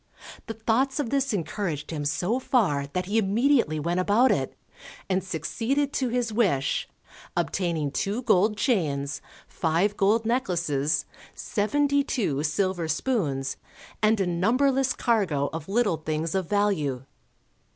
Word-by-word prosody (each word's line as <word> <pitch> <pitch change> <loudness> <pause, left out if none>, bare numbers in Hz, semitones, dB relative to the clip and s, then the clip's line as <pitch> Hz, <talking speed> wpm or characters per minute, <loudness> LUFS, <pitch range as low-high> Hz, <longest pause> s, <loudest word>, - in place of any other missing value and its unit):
The 225 - -5
thoughts 245 +6 0
of 270 -6 -2
this 275 0 +1
encouraged 170 -5 -3
him 150 -2 -3
so 185 - 0
far 175 - +1
that 180 0 -1
he 210 +4 +1
immediately 220 - +2
went 170 +4 -1
about 210 +7 +4
it, - - -1 0.5
and 185 -1 0
succeeded 230 - -1
to 260 -2 0
his 235 -2 -1
wish, 190 - +1 0.5
obtaining 165 -6 -1
two 205 - -2
gold 210 -1 +3
chains, 145 - 0 0.3
five 170 +6 0
gold 215 +3 +2
necklaces, 170 - 0 0.3
seventy 285 +6 +1
two 175 - -1
silver 175 +2 0
spoons, 150 - -1 0.4
and 215 0 +3
a 195 - +2
numberless 255 +10 +2
cargo 180 - 0
of 160 +1 -6
little 205 -5 +2
things 155 +1 -3
of 190 -3 -1
value. 160 -11 0
195 Hz, 130 wpm, -26 LUFS, 160-235 Hz, 0.5 s, about